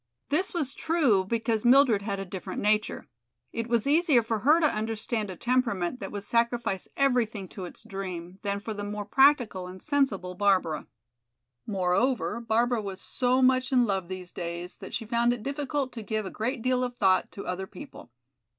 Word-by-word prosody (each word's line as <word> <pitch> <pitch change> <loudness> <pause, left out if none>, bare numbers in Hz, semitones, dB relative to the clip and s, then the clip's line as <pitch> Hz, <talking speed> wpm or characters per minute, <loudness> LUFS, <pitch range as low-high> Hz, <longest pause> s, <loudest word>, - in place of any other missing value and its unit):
This 365 +7 +2
was 300 -7 -1
true 285 - +2
because 225 +1 -1
Mildred 245 -4 +5
had 200 -1 -3
a 195 - -4
different 185 -1 -6
nature; 215 +1 0 0.5
it 230 0 -3
was 235 -2 +1
easier 295 -4 +4
for 225 -1 -1
her 300 +10 +5
to 325 - +3
understand 220 -3 -1
a 185 - -6
temperament 240 -2 0
that - - -6
would 205 -1 -5
sacrifice 235 -3 0
everything 235 -7 +1
to 190 - -7
its 175 - -10
dream, 190 -4 -6
than 200 -1 -2
for 220 +2 -5
the 205 -1 -5
more 205 0 -4
practical 250 -10 +3
and 185 +1 -9
sensible 265 -12 0
Barbara. 185 -5 +1 0.8
Moreover, 210 +5 +1
Barbara 235 +1 +1
was 195 -2 -6
so 255 +1 +1
much 255 +1 +3
in 250 -2 +4
love 195 -4 -1
these 185 -1 -7
days 170 0 -5
that - - -7
she 225 - -3
found 235 +2 +2
it 235 -3 -6
difficult 280 0 -2
to 230 - -6
give 215 0 -2
a 190 - -5
great 230 +2 -3
deal 255 0 +2
of 245 -1 -3
thought 190 -3 +3
to 200 - -7
other 185 +1 -3
people. 290 - -11
225 Hz, 185 wpm, -28 LUFS, 195-255 Hz, 0.8 s, Mildred